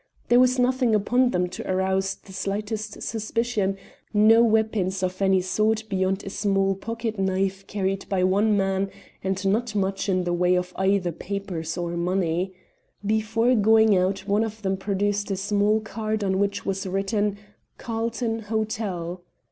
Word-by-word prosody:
There 240 - +6
was 255 0 +4
nothing 250 -2 +2
upon 245 +5 +2
them 180 -4 0
to 185 - -5
arouse 190 0 0
the 190 - -16
slightest 210 +2 -4
suspicion, 220 -3 -1 0.4
no 220 +2 +6
weapons 215 -4 +1
of 185 +1 -2
any 190 -1 +4
sort 215 +4 +1
beyond 190 -1 0
a - - -5
small 195 -1 +1
pocket 225 +2 -4
knife 190 0 -1
carried 195 -1 -2
by 190 -2 +1
one 205 +3 +3
man, 195 0 0 0.3
and 190 +1 -2
not 215 +3 0
much 195 0 -1
in 185 -1 +2
the 175 0 -1
way 180 +1 +3
of 180 0 -2
either 190 -2 +1
papers 175 -2 -5
or 175 -1 -2
money. 175 +1 0 0.5
Before 220 +3 +2
going 220 -1 +5
out 190 +1 0
one 205 +2 +2
of 220 -1 -6
them 190 0 +1
produced 205 +1 -1
a 195 - -1
small 205 +2 +2
card 220 -1 -3
on 190 -1 +1
which 200 0 -1
was 195 0 -2
written, 200 +2 0 0.4
'Carlton 230 0 -2
Hotel.' 210 -5 -3
200 Hz, 155 wpm, -25 LUFS, 190-220 Hz, 0.5 s, There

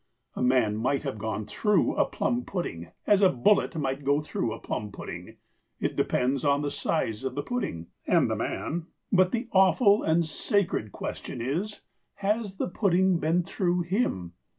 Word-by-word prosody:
A - - -4
man 125 -4 +3
might 130 +5 0
have 135 -7 -4
gone 110 0 -3
"through" 210 - +1
a - - +3
plum 245 0 -1
pudding 85 - -4 0.2
as 205 -1 +4
a 190 - +7
bullet 180 +8 +2
might 140 -2 -2
go 140 +2 +3
through 150 -6 -2
a - - -4
plum 105 -1 -4
pudding; - - -8 0.4
it - - -1
depends 130 +1 +1
on 145 0 +2
the 145 - -1
size 115 -8 -1
of 130 -1 -3
the 145 - -2
pudding—and 170 - -1
the - - -1
man. 165 0 -3 0.2
But 185 -2 +4
the 240 0 -2
awful 200 +2 +5
and 165 +1 +2
sacred 170 - 0
question - - -6
is 165 - -3 0.3
"Has 205 0 -1
the - - -1
pudding 185 -1 +2
been 165 +3 +1
through 175 0 0
him?" 170 - -1
160 Hz, 170 wpm, -27 LUFS, 125-195 Hz, 0.4 s, a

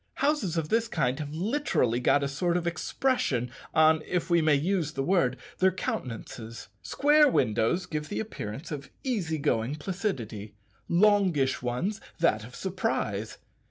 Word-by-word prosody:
Houses 275 - 0
of 155 -2 -1
this 230 0 +2
kind 135 - 0
have 145 -1 -5
literally 175 - 0
got 140 +3 +3
a - - +1
sort 170 +5 0
of 175 - -3
expression 165 - 0 0.2
on 155 0 +5
if 180 0 -1
we 170 -1 +5
may 155 -2 +4
use 165 +1 0
the 135 - -2
word 160 -7 +2 0.2
their 190 0 +5
countenances. 115 -8 -5
Square 295 +1 +4
windows 125 - +1
give 155 -3 -4
the - - -3
appearance 140 - -6
of 140 -2 -6
easy 195 - -1
going 140 -3 0
placidity; 140 - -4 0.3
longish 180 -7 +3
ones, 145 - -2 0.2
that 110 -11 +2
of 125 +3 -11
surprise. 110 - -2
160 Hz, 150 wpm, -28 LUFS, 125-190 Hz, 0.3 s, on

